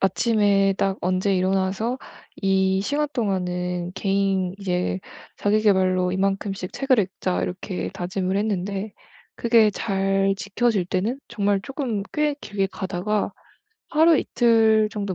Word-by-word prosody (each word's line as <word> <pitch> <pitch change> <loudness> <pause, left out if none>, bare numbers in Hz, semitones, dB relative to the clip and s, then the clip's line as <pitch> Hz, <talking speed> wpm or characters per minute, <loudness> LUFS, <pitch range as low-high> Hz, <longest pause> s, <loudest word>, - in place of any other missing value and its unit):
아침에 200 0 +3
딱 195 0 +1
언제 185 +2 +1
일어나서 190 +6 0 0.4
이 190 -1 +2
시간 290 +7 0
동안은 180 -5 -2
개인 195 -2 0
이제 180 -1 -1 0.4
'자기계발로 190 -3 +2
이만큼씩 195 0 -2
책을 270 -3 +2
읽자.' 185 -1 -2
이렇게 185 +1 -4
다짐을 185 +1 -2
했는데 200 0 -2 0.4
그게 230 -2 +4
잘 195 -1 0
지켜질 200 -1 0
때는 215 +9 -1
정말 205 -3 0
쪼끔 260 -7 -3
꽤 300 -1 +1
길게 195 -2 -2
가다가 195 +2 -2 0.6
하루 320 0 +5
이틀 225 -2 +3
정도 200 -3 -3
195 Hz, 260 characters per minute, -23 LUFS, 185-220 Hz, 0.6 s, 하루